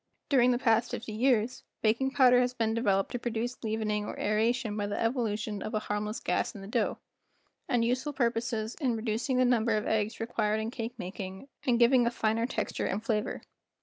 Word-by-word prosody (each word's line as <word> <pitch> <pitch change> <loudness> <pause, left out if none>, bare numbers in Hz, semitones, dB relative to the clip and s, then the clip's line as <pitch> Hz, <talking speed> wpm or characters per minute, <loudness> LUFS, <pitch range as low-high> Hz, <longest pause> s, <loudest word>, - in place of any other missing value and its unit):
During 250 -3 +5
the 245 - +3
past 230 -1 +2
fifty 220 - -5
years, 240 +1 +1 0.2
baking 230 +5 +2
powder 250 -1 +5
has 250 0 +1
been 225 -2 0
developed 200 -4 +1
to 245 - -3
produce 240 +1 -3
leavening 215 -1 -1
or - - -6
aeration 220 +1 +1
by 205 -1 -1
the 205 - -3
evolution 220 -3 -1
of 215 - -4
a - - +2
harmless 210 +1 -3
gas - - -1
in 200 - -8
the 195 - -8
dough, 210 - 0 0.7
and 235 -2 +2
useful 255 +5 0
purposes 235 -3 -1
in 250 -4 +1
reducing 225 +4 -1
the 255 - +4
number 230 -3 +2
of 210 - -2
eggs 220 0 0
required 220 -2 0
in 220 +1 -3
cake 235 -1 -5
making 190 +6 -7 0.2
and 240 -2 +4
giving 240 0 +5
a - - +4
finer 230 0 0
texture - - -2
and 205 +3 -2
flavor. 210 -2 -1
225 Hz, 195 wpm, -30 LUFS, 215-245 Hz, 0.7 s, During